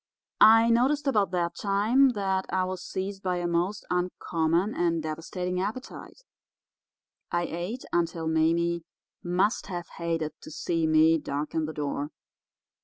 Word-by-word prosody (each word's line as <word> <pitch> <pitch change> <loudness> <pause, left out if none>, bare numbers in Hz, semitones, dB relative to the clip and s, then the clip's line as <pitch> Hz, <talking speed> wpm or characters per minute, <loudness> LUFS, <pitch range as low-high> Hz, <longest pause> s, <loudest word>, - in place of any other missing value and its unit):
I 225 +1 +7
noticed 270 +6 +2
about 210 -8 +2
that 170 -1 -1
time 220 +7 +3
that 190 -2 -1
I 185 0 +1
was 185 0 -4
seized 195 +1 -4
by 185 -2 -1
a 175 - -2
most 175 +5 -1
uncommon 180 +1 0
and 170 -2 0
devastating 180 +3 -3
appetite. 250 - -6 1.1
I 175 0 +1
ate 175 +10 -4
until 165 -1 0
Mame 170 +2 +2 0.4
must 180 +4 0
have 175 -3 -5
hated 165 -2 -2
to - - -10
see 165 0 -1
me 160 +1 +5
darken 150 +2 -2
the 155 - -5
door. 145 -1 -3
175 Hz, 135 wpm, -27 LUFS, 165-200 Hz, 1.1 s, I